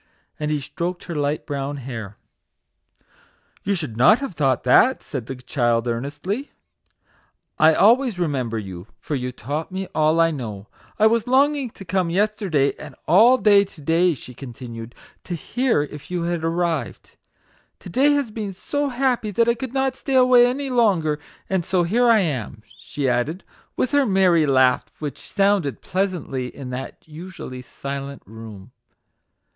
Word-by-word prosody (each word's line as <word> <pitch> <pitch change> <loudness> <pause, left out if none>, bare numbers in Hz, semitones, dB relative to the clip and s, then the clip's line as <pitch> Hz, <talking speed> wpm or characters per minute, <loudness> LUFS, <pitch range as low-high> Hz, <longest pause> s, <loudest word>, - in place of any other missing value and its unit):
And 150 0 -2
he 150 -1 0
stroked 175 +5 -4
her 170 - -6
bright 145 0 -1
brown 140 0 -3
hair. 115 -6 -7 0.7
" - - -35
You 200 +1 0
should 155 - -4
not 210 - +6
have 275 -7 -5
thought 135 -5 +1
that," 240 - +4
said 125 -6 -6
the 135 - -5
child, 120 -2 0
earnestly; 145 - -3 0.6
" - - -36 0.3
I 155 +1 +6
always 235 0 +4
remember 135 -9 -1
you, 95 -3 -7
for - - -6
you 125 -2 -2
taught 145 - -5
me 190 +1 -3
all 155 +1 +2
I 165 0 +4
know. 110 -9 -6 0.3
I 215 - +4
was 230 +1 +3
longing 275 +1 +2
to 195 - -12
come 185 0 0
yesterday, 190 -7 +1
and - - -10
all 225 +10 +6
day 205 -4 +5
to 190 -4 -13
day," 165 +3 +2
she 125 - -11
continued, 120 -2 -9
" - - -32
to 175 - -3
hear 235 - 0
if 150 -1 -10
you 180 -1 -2
had 170 -1 -2
arrived. 165 -2 -2 0.7
To - - -9
day 280 +8 +4
has 280 -6 0
been 210 -3 -5
so 285 +9 -2
happy 250 -3 0
that 230 +3 +2
I 235 - +4
could 245 +1 -6
not 265 0 0
stay 270 0 -3
away 250 -1 +6
any 270 +2 -3
longer, 180 -11 +2 0.3
and 190 -2 0
so 180 +1 +1
here 235 +8 +2
I 225 -2 +5
am," 120 - -3
she 140 +3 -5
added, 130 +9 -1 0.3
with 255 - 0
her 285 -2 +3
merry 185 -5 +3
laugh, 130 -2 +3
which 150 -2 -7
sounded 195 - +1
pleasantly 180 -9 -2
in 125 0 -8
that 130 +4 -7
usually 155 -5 -8
silent 140 +2 -7
room. 110 0 -11
165 Hz, 170 wpm, -22 LUFS, 135-215 Hz, 0.7 s, not